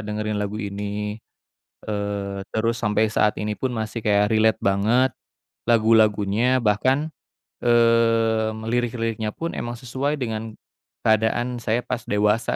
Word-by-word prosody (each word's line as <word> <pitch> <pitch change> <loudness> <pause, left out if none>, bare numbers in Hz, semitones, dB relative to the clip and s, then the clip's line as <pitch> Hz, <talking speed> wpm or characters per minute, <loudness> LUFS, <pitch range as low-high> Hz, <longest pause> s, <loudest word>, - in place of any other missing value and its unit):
dengerin 105 0 -3
lagu 105 +1 -3
ini, 105 +1 -4 0.7
eee, 100 -1 -3
terus 115 +1 0
sampai 105 0 +1
saat 105 0 +1
ini 105 0 -3
pun 130 -2 -2
masih 110 0 -4
kayak 105 0 +3
relate 110 -2 +3
banget 110 +7 +2 0.5
lagu-lagunya. 110 +1 +3
Bahkan, 130 +8 +1 0.5
eee, 115 -2 +3 0.2
lirik-liriknya 115 -2 -1
pun 165 +1 -4
emang 120 0 -4
sesuai 135 +4 -2
dengan 110 -3 -4 0.5
keadaan 110 +3 +1
saya 115 +1 -1
pas 125 -1 -3
dewasa 105 +2 +1
110 Hz, 120 wpm, -23 LUFS, 105-120 Hz, 0.7 s, kayak